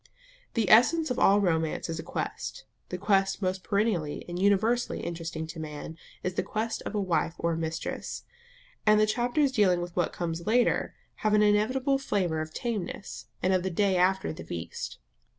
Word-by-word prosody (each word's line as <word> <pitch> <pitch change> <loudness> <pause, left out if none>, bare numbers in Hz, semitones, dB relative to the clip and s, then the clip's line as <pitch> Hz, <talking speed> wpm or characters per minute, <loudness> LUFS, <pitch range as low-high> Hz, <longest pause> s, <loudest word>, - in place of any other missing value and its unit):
The 225 -4 +1
essence 310 +7 +5
of 250 - -1
all 200 +1 +5
romance 165 -5 0
is 165 -1 -4
a - - -2
quest; - - -5 0.2
the 180 - -3
quest 195 0 +2
most 185 -1 -2
perennially 200 -8 0
and 175 +1 -4
universally 215 +5 +2
interesting 165 -1 -4
to 160 +1 -8
man 155 0 -6 0.3
is 185 - -1
the - - 0
quest 225 +1 -3
of - - -5
a - - +1
wife 175 -3 0
or 170 - 0
a - - -1
mistress; 160 0 -4 0.6
and 215 0 +5
the 215 - +5
chapters 245 +6 +1
dealing 200 -8 +3
with 175 0 -5
what 175 - +1
comes 170 +1 -4
later 240 +3 +2 0.2
have 215 -1 +2
an 210 - +5
inevitable 255 +7 +2
flavour 180 -11 0
of 155 0 -5
tameness, 195 - -4 0.2
and 185 +1 +3
of 185 - +3
the 190 - -1
day 195 +2 +2
after 185 0 +2
the - - -8
feast. 80 -7 -6
190 Hz, 185 wpm, -28 LUFS, 165-215 Hz, 0.6 s, essence